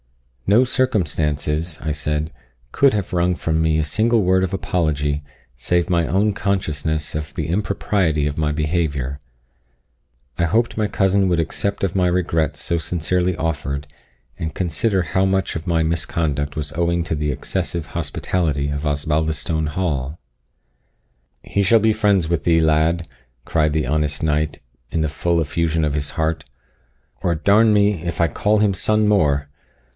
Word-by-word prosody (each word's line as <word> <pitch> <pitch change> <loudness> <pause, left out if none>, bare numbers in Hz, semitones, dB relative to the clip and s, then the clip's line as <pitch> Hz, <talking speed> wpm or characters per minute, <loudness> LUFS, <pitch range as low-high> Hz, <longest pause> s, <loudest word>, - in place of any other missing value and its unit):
"No 110 +6 +5
circumstances," 80 - 0
I 75 -1 -2
said, 75 +1 -2 0.4
"could 140 -1 +4
have 100 -4 -2
wrung 90 0 +2
from 80 -1 -1
me 80 -1 +2
a 80 - +1
single 110 +7 +2
word 95 +1 +3
of 95 0 -2
apology, 75 -6 -1 0.3
save 85 +9 0
my 85 -2 +2
own 100 +5 +2
consciousness 80 -7 -1
of 75 -4 -5
the - - -2
impropriety 90 -4 0
of 75 - -4
my 75 -1 +1
behaviour. 75 -4 -1 1.2
I - - +2
hoped 115 +7 +1
my 110 -1 0
cousin 95 -1 +2
would 85 -2 +1
accept 100 +5 -2
of 90 - -4
my 90 -2 +3
regrets 85 -4 0
so 85 - 0
sincerely 90 +2 0
offered, 75 -3 -3 0.5
and 80 -1 -3
consider 95 +2 0
how 90 +4 0
much 95 0 0
of 85 +2 -5
my 85 -2 +2
misconduct 75 -2 -1
was 70 -2 -3
owing 85 +1 0
to 80 - -2
the 75 0 -1
excessive 85 +3 -3
hospitality 75 -2 -1
of 70 +1 -3
Osbaldistone 80 +1 0
Hall." 75 -3 -2 1.2
"He 100 - 0
shall 115 +4 +5
be 110 +1 +3
friends 100 -6 +2
with 80 -3 -1
thee, 80 0 +3
lad," 80 +2 +2 0.4
cried 75 -2 +1
the 75 -3 0
honest 75 0 0
knight, 75 0 0 0.3
in 80 - -2
the 80 - +1
full 85 +3 0
effusion 80 0 0
of 75 - -1
his 75 -1 -1
heart; 80 -1 -1 0.8
"or 85 -2 +1
d 80 +5 -2
n 110 +2 +6
me, 105 -4 +2
if 85 -2 -4
I 85 - +4
call 105 +7 +1
him 105 -2 +3
son 105 +3 +1
more! 75 -8 +2
80 Hz, 160 wpm, -21 LUFS, 75-95 Hz, 1.2 s, n